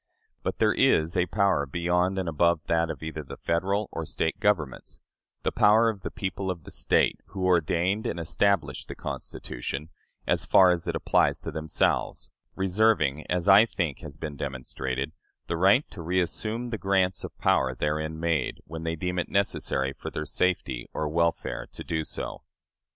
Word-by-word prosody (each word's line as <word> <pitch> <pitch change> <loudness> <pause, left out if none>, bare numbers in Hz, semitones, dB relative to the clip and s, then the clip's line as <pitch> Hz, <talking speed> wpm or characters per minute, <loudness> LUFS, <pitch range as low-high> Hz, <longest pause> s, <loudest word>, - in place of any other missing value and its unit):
But - - -3
there - - +3
is 80 +2 +3
a 90 -1 +2
power 95 -7 +2
beyond 90 +5 +1
and 95 -2 -1
above 85 +1 +2
that 85 0 +1
of 80 - -6
either 80 0 -4
the 70 - -9
Federal 95 +5 0
or 80 - -4
State 80 +1 -2
governments 85 -11 -1 0.4
the - - +1
power 110 +2 +5
of 105 -4 -5
the - - -4
people 95 -2 -4
of 85 -3 -4
the - - -11
State, - - +2
who 95 -2 -4
ordained 90 +3 +2
and 85 - -3
established 85 -3 0
the - - -7
Constitution, 70 +5 -6 0.4
as - - +1
far 95 -2 +6
as 90 0 -2
it 85 - -1
applies - - +2
to - - -5
themselves, 80 -1 -1 0.2
reserving, 95 -7 +2
as 90 +1 0
I 100 +3 +8
think 85 -10 -2
has 75 -1 -9
been 75 -2 -5
demonstrated, 65 0 -4 0.3
the 85 - -2
right 95 - +4
to 90 - -8
reassume 105 +7 -1
the 115 - -3
grants 95 -2 +1
of - - -8
power 65 -1 +2
therein 80 +3 -2
made, 80 -5 0
when 80 +1 -7
they 80 0 -2
deem 90 +2 -2
it - - -2
necessary 70 -8 0
for - - -7
their 75 - -4
safety 70 -6 -1
or 75 - -1
welfare 85 +1 0
to - - -7
do 80 -1 -2
so. - - -6
85 Hz, 175 wpm, -27 LUFS, 75-95 Hz, 0.4 s, I